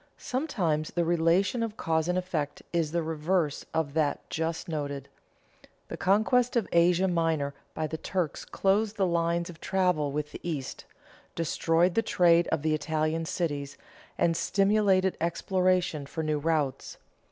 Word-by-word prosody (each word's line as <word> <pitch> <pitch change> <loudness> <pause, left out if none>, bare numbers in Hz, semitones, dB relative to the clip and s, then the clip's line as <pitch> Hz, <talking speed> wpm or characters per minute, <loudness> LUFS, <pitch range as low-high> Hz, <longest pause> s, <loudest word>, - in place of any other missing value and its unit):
_ - - -32
Sometimes 185 - -1
the 170 -1 -1
relation 175 +7 +2
of 225 -1 -3
cause 160 0 0
and 180 0 +1
effect 165 -6 -3
is 165 -3 0
the 170 0 0
reverse 160 0 -1
of 155 -3 -1
that 155 -2 0
just 160 +2 -2
noted. 145 -4 -4 0.8
The - - -4
conquest 230 +6 +2
of 235 -4 +1
Asia 175 +2 +4
Minor 165 -5 0 0.2
by 155 - -1
the 160 +1 -5
Turks 175 -4 -2
closed 205 +2 +1
the 195 - +2
lines 170 0 0
of 170 -2 -11
travel 180 -7 +1
with 150 +1 -3
the - - -8
East, 150 -6 -5 0.5
destroyed 165 +1 +1
the 225 - +3
trade 175 -5 +4
of 160 -3 -1
the 155 -1 +2
Italian 155 +2 -1
cities, 145 -5 -3 0.4
and 165 -1 +2
stimulated 195 -1 +2
exploration 180 -3 0
for 160 +2 -4
new 155 -1 0
routes. 145 -4 -1
165 Hz, 155 wpm, -28 LUFS, 155-185 Hz, 0.8 s, Asia